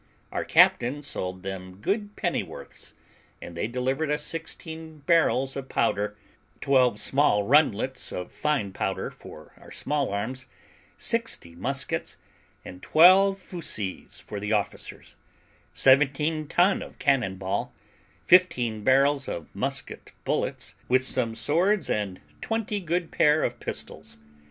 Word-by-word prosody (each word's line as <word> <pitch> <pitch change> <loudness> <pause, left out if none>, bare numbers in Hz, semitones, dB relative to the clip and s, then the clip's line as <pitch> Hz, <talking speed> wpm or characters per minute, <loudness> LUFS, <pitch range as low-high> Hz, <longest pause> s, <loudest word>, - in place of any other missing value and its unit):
Our - - -2
captain 130 +5 +4
sold 95 -8 -4
them 95 -1 -6
good 205 - -2
pennyworths, - - -4 0.5
and 85 - -9
they 85 - -2
delivered 130 +5 -1
us 150 +1 0
sixteen 160 -1 -6
barrels 155 -6 +2
of 135 -1 -6
powder, 105 -2 0 0.4
twelve 125 -6 +3
small 135 -7 +3
rundlets 130 0 +2
of 90 - -5
fine 140 -10 -1
powder - - -3
for - - -13
our - - -15
small 145 -2 -1
arms, 125 +6 -4 0.5
sixty 230 - -1
muskets, 135 +10 -3 0.5
and 90 0 -10
twelve 190 +4 +6
fuzees 155 - -4
for 105 - -7
the 105 +1 -4
officers; 105 -2 -4 0.5
seventeen 150 +3 +3
ton 180 +6 +3
of - - -10
cannon 125 -9 +1
ball, 95 0 -3 0.5
fifteen 125 - +3
barrels 135 +2 +3
of 85 - -6
musket - - -4
bullets, - - -2 0.2
with 130 +1 +4
some 125 -3 0
swords 170 - +1
and 100 -3 -2 0.2
twenty 220 -2 -2
good 175 -1 -2
pair 150 +1 +3
of - - -2
pistols. - - -6
135 Hz, 125 wpm, -26 LUFS, 105-160 Hz, 0.5 s, twelve